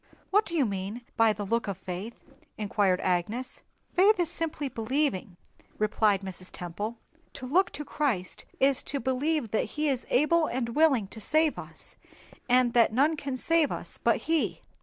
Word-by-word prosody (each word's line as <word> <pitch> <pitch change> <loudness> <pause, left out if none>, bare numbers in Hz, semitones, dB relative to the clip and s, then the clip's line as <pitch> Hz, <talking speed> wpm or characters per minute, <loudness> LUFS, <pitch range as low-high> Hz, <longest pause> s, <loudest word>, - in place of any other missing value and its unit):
"What 415 +2 +3
do 335 - -4
you 290 -5 +3
mean 200 +3 -4
by 225 -1 +5
the 205 -1 -4
look 230 +2 0
of 195 -3 -3
faith?" 190 +5 -6 0.4
inquired 200 -3 +1
Agnes. 205 +8 -2 0.3
"Faith 390 +3 +5
is 340 -2 +1
simply 325 -4 -3
believing," 235 - -1 0.4
replied 210 -2 +2
Mrs. 185 -1 -7
Temple. 205 +7 -5 0.4
"To 260 - -7
look 350 +9 +3
to 295 - -6
Christ 245 -12 -2
is 270 -1 +4
to 280 - -3
believe 260 0 0
that 220 - +1
He 300 0 +1
is 260 -3 -2
able 310 +5 +3
and 240 -1 -2
willing 270 -4 +3
to 220 - -10
save 310 +6 +2
us, - - -9 0.5
and 250 -1 +4
that 235 -2 +5
none 285 +8 +3
can 275 -3 -4
save 330 +2 +2
us - - -6
but - - +3
He." 325 -1 0
250 Hz, 170 wpm, -28 LUFS, 210-300 Hz, 0.5 s, by